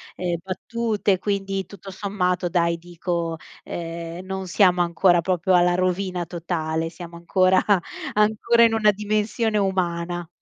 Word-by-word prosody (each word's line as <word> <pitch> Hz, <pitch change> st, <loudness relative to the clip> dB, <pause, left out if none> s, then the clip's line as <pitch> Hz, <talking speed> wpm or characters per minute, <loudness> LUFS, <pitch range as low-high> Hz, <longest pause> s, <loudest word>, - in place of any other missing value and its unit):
ehm, 175 Hz, -1 st, -2 dB
battute, 210 Hz, +1 st, -1 dB
quindi 195 Hz, 0 st, -2 dB
tutto 195 Hz, +1 st, -12 dB
sommato 185 Hz, -2 st, -1 dB
dai 170 Hz, -1 st, +1 dB
dico, 170 Hz, -1 st, -3 dB, 0.3 s
ehm: 170 Hz, +1 st, -6 dB
"Non 190 Hz, 0 st, -5 dB
siamo 180 Hz, -1 st, +4 dB
ancora 175 Hz, 0 st, +3 dB
proprio 185 Hz, +1 st, 0 dB
alla 175 Hz, 0 st, +4 dB
rovina 185 Hz, 0 st, -1 dB
totale," 165 Hz, -1 st, -3 dB
siamo 170 Hz, 0 st, -10 dB
ancora 185 Hz, +2 st, +3 dB, 0.5 s
ancora 220 Hz, +2 st, +3 dB
in 230 Hz, -, +4 dB
una 215 Hz, -1 st, +4 dB
dimensione 215 Hz, +2 st, -1 dB
umana. 175 Hz, -3 st, -1 dB
185 Hz, 125 wpm, -23 LUFS, 170-200 Hz, 0.5 s, siamo